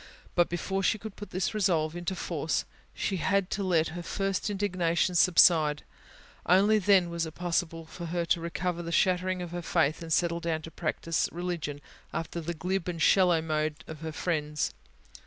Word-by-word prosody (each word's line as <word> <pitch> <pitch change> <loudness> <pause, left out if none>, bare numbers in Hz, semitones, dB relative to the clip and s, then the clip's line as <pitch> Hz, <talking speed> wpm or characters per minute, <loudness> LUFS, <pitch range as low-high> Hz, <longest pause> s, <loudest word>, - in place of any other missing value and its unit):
But, 175 -1 +3
before 190 +3 -2
she 205 +4 +2
could 215 -1 -8
put 205 - -9
this 185 +3 -1
resolve 170 -6 +1
into 175 +2 -3
force, 160 -5 -2 0.3
she 195 - -2
had 190 +2 +1
to 200 - -1
let 165 -4 +2
her 175 +2 -6
first 195 +3 -2
indignation 185 -3 0
subside: 165 -4 +5 0.6
only 200 +4 +5
then 190 -3 +4
was 170 -1 -2
it 160 - -10
possible 165 -2 -2
for 170 +1 -8
her 170 +1 -1
to 170 0 +1
recover 175 +1 -2
the 170 0 -5
shattering 185 0 +1
of 175 - -7
her 175 0 -4
faith, 160 -2 +1
and 165 -1 -7
settle 170 +1 +2
down 165 -2 -2
to 165 - -8
practise 165 0 -1
religion 170 -5 -4 0.3
after 165 +1 -3
the 170 +1 -4
glib 180 +3 -2
and 175 -2 -3
shallow 175 -1 +4
mode 155 -1 -2
of 160 -1 -9
her 160 0 -5
friends. 150 -2 -1
170 Hz, 180 wpm, -29 LUFS, 160-185 Hz, 0.6 s, subside